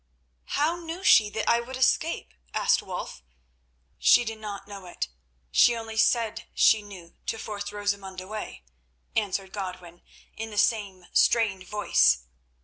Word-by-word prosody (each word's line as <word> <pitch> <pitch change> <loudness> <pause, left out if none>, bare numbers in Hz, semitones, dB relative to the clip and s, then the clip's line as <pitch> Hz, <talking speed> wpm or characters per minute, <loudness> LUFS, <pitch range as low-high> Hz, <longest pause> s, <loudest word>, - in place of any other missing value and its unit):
'" - - -44
"How 310 +4 +2
knew 340 +2 -7
she 215 - +6
that 220 +1 -3
I 235 0 +3
should 260 +2 -7
escape?" 260 - +1 0.2
asked - - +3
Wulf. - - -6 0.8
"She 245 - +5
did 220 -1 -5
not 200 -2 -7
know 200 -3 -9
it. 175 - -4 0.4
She 240 - +5
only 225 -1 -6
said 225 0 +1
she 220 - +5
knew 190 -5 -12
to 225 - -1
force 205 -2 -5
Rosamund 200 -2 -3
away," 185 - -7 0.5
answered 195 -2 -1
Godwin 180 -3 -7 0.3
in 225 0 -5
the 210 - -8
same 200 -4 +1
strained 195 -6 +3
voice. 205 - +3
210 Hz, 145 wpm, -27 LUFS, 190-225 Hz, 0.8 s, she